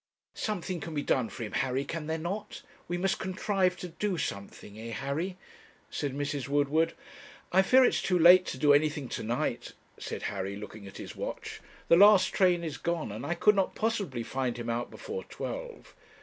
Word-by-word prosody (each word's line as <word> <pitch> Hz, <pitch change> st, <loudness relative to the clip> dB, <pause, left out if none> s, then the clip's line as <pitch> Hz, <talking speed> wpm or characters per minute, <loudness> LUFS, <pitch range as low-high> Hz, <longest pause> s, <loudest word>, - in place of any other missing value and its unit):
'Something 185 Hz, -4 st, -3 dB
can 160 Hz, +1 st, -6 dB
be 145 Hz, -, -1 dB
done 125 Hz, -4 st, +1 dB
for 120 Hz, -, -7 dB
him, 105 Hz, -, -5 dB
Harry, 135 Hz, +1 st, 0 dB
can 160 Hz, -2 st, -5 dB
there 160 Hz, 0 st, -1 dB
not? 195 Hz, +6 st, -5 dB, 0.2 s
We 175 Hz, -, -2 dB
must 190 Hz, +2 st, 0 dB
contrive 190 Hz, -1 st, 0 dB
to 180 Hz, -, -6 dB
do 180 Hz, +3 st, -2 dB
something 100 Hz, -7 st, -5 dB
eh, 115 Hz, +1 st, -6 dB
Harry?' 155 Hz, -, -3 dB, 0.5 s
said 140 Hz, -3 st, -3 dB
Mrs. 145 Hz, -1 st, -2 dB
Woodward. 145 Hz, +3 st, +2 dB, 0.6 s
'I 190 Hz, -, +6 dB
fear 255 Hz, +7 st, +6 dB
it -, -, +6 dB
is -, -, -1 dB
too 180 Hz, -, +1 dB
late 180 Hz, +2 st, +8 dB
to -, -, -4 dB
do 145 Hz, +2 st, +5 dB
anything 145 Hz, -2 st, +2 dB
to -, -, -4 dB
night,' 115 Hz, +2 st, -2 dB, 0.3 s
said -, -, -5 dB
Harry, 95 Hz, +1 st, -3 dB
looking 105 Hz, 0 st, -9 dB
at 95 Hz, -, -11 dB
his -, -, -8 dB
watch. -, -, -6 dB, 0.3 s
'The 170 Hz, -, +6 dB
last 200 Hz, -1 st, +7 dB
train 180 Hz, -3 st, +3 dB
is 155 Hz, -3 st, -4 dB
gone, 170 Hz, -8 st, -2 dB
and 110 Hz, +4 st, -6 dB
I 170 Hz, -, 0 dB
could 210 Hz, +4 st, +5 dB
not 195 Hz, -2 st, 0 dB
possibly 200 Hz, -, -1 dB
find 130 Hz, 0 st, -2 dB
him 120 Hz, -1 st, -3 dB
out 120 Hz, +1 st, -2 dB
before 465 Hz, +1 st, -6 dB
twelve.' -, -, -7 dB
160 Hz, 195 wpm, -29 LUFS, 135-185 Hz, 0.6 s, late